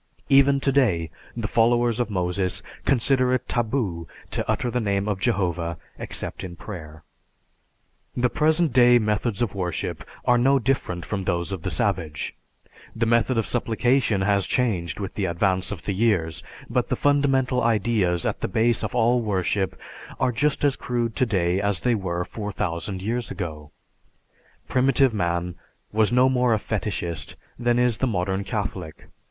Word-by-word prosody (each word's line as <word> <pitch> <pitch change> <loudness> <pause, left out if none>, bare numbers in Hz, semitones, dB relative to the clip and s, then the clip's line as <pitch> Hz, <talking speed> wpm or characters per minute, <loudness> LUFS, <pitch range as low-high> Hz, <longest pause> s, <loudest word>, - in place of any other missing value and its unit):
Even 140 0 +5
today, 120 - +1 0.3
the 110 -2 -2
followers 120 +1 +2
of 120 - 0
Moses 90 -1 -1 0.2
consider 130 0 +3
it 130 - -4
taboo 110 -8 -1 0.2
to - - -1
utter 120 - 0
the 125 - 0
name 100 -2 0
of 100 -3 -1
Jehovah 90 -7 -1 0.2
except - - -3
in 90 -2 -7
prayer. 80 -5 -9 1.1
The 125 0 +3
present 155 +2 +2
day 120 -1 +7
methods 105 0 0
of 110 - -2
worship 90 -4 -3 0.2
are 120 0 +4
no 135 +3 +4
different 115 -9 -1
from 95 -3 -3
those 85 0 -1
of 95 -4 -4
the - - -3
savage; 80 -2 -2 0.6
the 115 +1 +1
method 115 +2 +2
of 115 - +1
supplication 120 -2 +1
has 100 0 +2
changed 95 -10 0
with 100 -2 -4
the 100 - -1
advance 95 +2 0
of 100 -5 -6
the 100 - -2
years, 95 -7 +1 0.3
but - - -1
the - - +1
fundamental 135 -3 +2
ideas 105 -6 +1
at - - -2
the - - 0
base 115 +1 +1
of - - -3
all 120 +1 +3
worship 95 -2 -1 0.4
are 125 - +2
just 145 +5 0
as 140 -2 +3
crude 120 -2 -2
today 95 -7 +1
as 100 -4 0
they 125 - +2
were 90 -4 -2
4000 95 -3 -4
years 115 +3 -2
ago. 80 -5 -6 1.0
Primitive 135 0 +3
man 85 -2 -1 0.4
was 110 0 +2
no 125 +1 +5
more 125 -3 +3
a - - +1
fetishist 100 -6 -3 0.2
than 120 0 +2
is 125 -3 +2
the 130 - +1
modern 95 -2 -1
Catholic. 95 -6 -4
110 Hz, 160 wpm, -24 LUFS, 95-125 Hz, 1.1 s, day